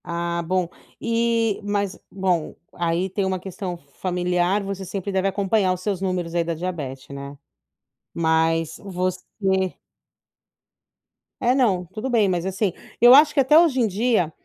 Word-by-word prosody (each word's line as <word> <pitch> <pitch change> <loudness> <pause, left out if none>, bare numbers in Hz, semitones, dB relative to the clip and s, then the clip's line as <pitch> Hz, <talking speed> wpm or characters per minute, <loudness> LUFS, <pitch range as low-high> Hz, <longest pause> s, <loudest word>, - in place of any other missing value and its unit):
Ah, 170 0 -2
bom, 180 +1 0 0.3
eh, 230 -2 +1
mas 200 -1 -1
bom, 185 -4 -1 0.2
aí 170 +2 0
tem 195 +2 -2
um 190 0 0
questão 185 -1 -6
familiar, 180 +5 -1
você 195 -1 -5
sempre 190 +1 -4
deve 190 0 +1
acompanhar 195 0 +1
os 180 - -6
seus 195 -1 -2
números 180 -3 -2
aí 170 -1 +2
da 165 0 -3
diabete 145 -6 -5
né? 140 +1 -8 0.8
Mas 160 0 +1
você 185 -2 -2 2.2
Eh, 250 +1 +3
não. 200 -9 +2
Tudo 215 +8 -5
bem, 220 -5 +3
mas 175 -1 -1
assim, 190 +1 0 0.3
eu 240 +2 +9
acho 295 +1 +6
que 290 - +1
até 275 +3 +6
hoje 325 -6 +4
em 235 - +3
dia, 210 -4 +1
185 Hz, 150 wpm, -23 LUFS, 170-210 Hz, 2.2 s, eu